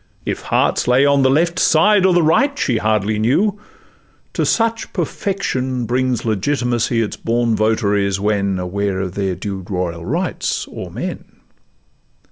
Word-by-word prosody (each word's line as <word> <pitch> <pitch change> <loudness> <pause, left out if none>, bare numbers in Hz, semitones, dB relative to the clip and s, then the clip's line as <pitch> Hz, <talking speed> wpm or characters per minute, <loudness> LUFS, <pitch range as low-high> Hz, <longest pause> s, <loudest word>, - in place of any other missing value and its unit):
If - - -3
hearts - - +1
lay 125 +3 +4
on 140 -1 +3
the 130 - +4
left 170 +5 +1
side 205 -2 +4
or 185 - +3
the 175 -1 +3
right 270 - +2
She 120 -4 0
hardly 110 0 0
knew, 190 - +1 0.7
to - - 0
such 230 -1 0
perfection 130 - -2
brings 125 0 -1
Legitimacy 120 +1 0
its 105 - -5
born 115 0 0
votaries, 100 -3 +1
when 100 -2 0
Aware 95 +1 -2
of 90 -2 -4
their 95 -2 -2
due 95 0 -5
royal 90 -3 -3
rights 170 - -2
o'er - - -7
men. - - -5
120 Hz, 145 wpm, -18 LUFS, 100-150 Hz, 0.7 s, lay